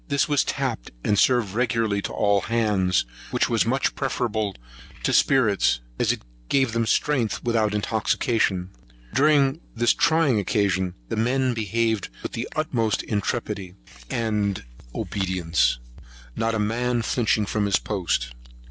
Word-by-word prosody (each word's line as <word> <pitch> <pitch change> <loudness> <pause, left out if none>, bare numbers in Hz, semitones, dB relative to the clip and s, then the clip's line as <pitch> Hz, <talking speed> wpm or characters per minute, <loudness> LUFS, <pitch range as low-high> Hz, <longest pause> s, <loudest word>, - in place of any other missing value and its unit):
This 140 -1 +1
was 145 -2 +2
tapped, - - -3
and 105 -1 +2
served 120 -7 +3
regularly 115 -3 0
to - - -4
all 100 -1 +2
hands, 105 - +1 0.2
which - - +1
was 115 -1 +2
much 130 +3 +1
preferable 110 -7 -2 0.5
to - - +1
spirits, 110 - +3 0.2
as - - +3
it - - -4 0.3
gave 135 -3 +2
them 115 -1 0
strength 130 -6 +1
without 110 -3 +1
intoxication. 105 -3 0 0.4
During 140 +2 +3
this 120 +1 +3
trying 160 -8 +3
occasion, 95 -3 0
the - - -2
men 125 +3 +1
behaved 110 -1 -1
with - - -4
the - - -4
utmost 120 -9 0
intrepidity 100 -3 -3 0.3
and 105 -4 -1 0.3
obedience, 85 -10 0 0.6
not 115 0 0
a - - -1
man 120 +3 0
flinching 110 -3 +1
from 105 +1 0
his 100 - +3
post. 85 - -2
110 Hz, 135 wpm, -24 LUFS, 100-125 Hz, 0.6 s, served